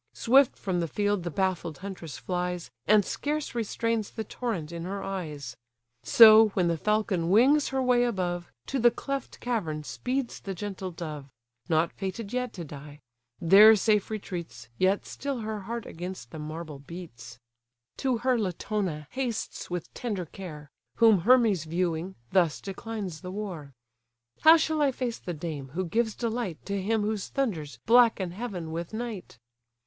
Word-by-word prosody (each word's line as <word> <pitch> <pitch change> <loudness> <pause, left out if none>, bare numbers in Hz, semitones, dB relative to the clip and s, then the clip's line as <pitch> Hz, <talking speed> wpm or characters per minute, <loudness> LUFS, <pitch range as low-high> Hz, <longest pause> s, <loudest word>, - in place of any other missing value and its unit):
Swift 265 +2 +4
from 185 -3 -1
the 170 - -1
field 205 +2 0
the 175 - -3
baffled 175 -3 -1
huntress 180 -7 -7
flies, 180 -5 -3 0.2
And 210 -2 +5
scarce 300 +1 -2
restrains 230 -1 -1
the 220 - -5
torrent 195 -8 -4
in 170 -1 -5
her 195 +2 -4
eyes: 150 -10 -5 0.5
So, 220 - +9
when 180 -3 +2
the 170 - +1
falcon 210 -3 0
wings 270 +9 +5
her 265 -1 -1
way 250 -1 +4
above, 180 -6 -2 0.2
To 270 - -1
the 240 0 +6
cleft 275 +3 -5
cavern 175 -11 -2
speeds 255 - -3
the 195 -1 -6
gentle 195 -1 -5
dove; 155 -5 -7 0.4
(Not 160 0 +2
fated 200 +3 -5
yet 250 -1 -1
to 175 - -6
die;) 145 0 -10 0.4
there 205 +6 +8
safe 210 0 +2
retreats, 175 - -6
Yet 190 +2 +2
still 275 -4 -4
her 215 -1 -3
heart 230 +3 -5
against 175 -8 -7
the 160 - -7
marble 155 -1 -6
beats. 135 -7 -10 0.6
To 260 -3 0
her 255 -2 +3
Latona 185 -4 -2
hastes 255 -4 -3
with 175 -2 -5
tender 205 -7 -3
care; 155 -4 -9 0.2
Whom 225 -4 +6
Hermes 220 - +4
viewing, 170 +2 -2 0.2
thus 175 -5 +3
declines 195 -3 -6
the 180 - -7
war: 185 -8 -6 0.7
"How 320 +1 +8
shall 315 -1 0
I 285 -2 +4
face 245 -2 -3
the 175 - -5
dame, 150 -3 -5
who 185 +1 -1
gives 220 +5 0
delight 230 -7 -2
To 200 -1 -2
him 215 +2 +1
whose 210 -2 -2
thunders 165 - -2
blacken 230 -6 +5
heaven 185 -5 -5
with 170 +5 -5
night? 220 - -6
195 Hz, 160 wpm, -28 LUFS, 170-230 Hz, 0.7 s, So